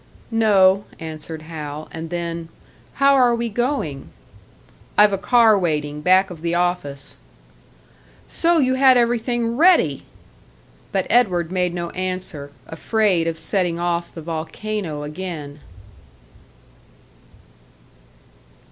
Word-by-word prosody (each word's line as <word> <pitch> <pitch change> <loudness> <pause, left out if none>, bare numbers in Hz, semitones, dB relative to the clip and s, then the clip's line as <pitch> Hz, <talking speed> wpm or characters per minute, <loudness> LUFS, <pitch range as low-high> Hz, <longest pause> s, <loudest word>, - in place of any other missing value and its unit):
"No," 200 -3 +4
answered 160 -1 -7
Hal; 155 -2 -7
and 160 0 -7
then, 170 -1 -4 0.5
"How 275 0 +4
are 250 -3 +4
we 235 0 -2
going?" 215 - -2 0.9
"I've 210 -1 +6
a - - +1
car 225 -2 +4
waiting, 150 -4 -2
back 185 +3 +3
of 165 -3 -10
the 170 0 -1
office." 175 -6 -2 1.1
"So 340 0 +2
you 260 -4 +2
had 260 -1 +5
everything 235 0 0
ready!" 355 +4 +4 0.9
But 190 -1 0
Edward 180 -8 +2
made 180 -1 -1
no 170 -1 -4
answer; 185 -6 -4 0.2
afraid 185 0 0
of 165 -1 -2
setting 170 0 -1
off 175 0 -2
the 165 - -9
volcano 165 0 -4
again. 150 -2 -7
180 Hz, 110 wpm, -21 LUFS, 160-225 Hz, 1.1 s, I've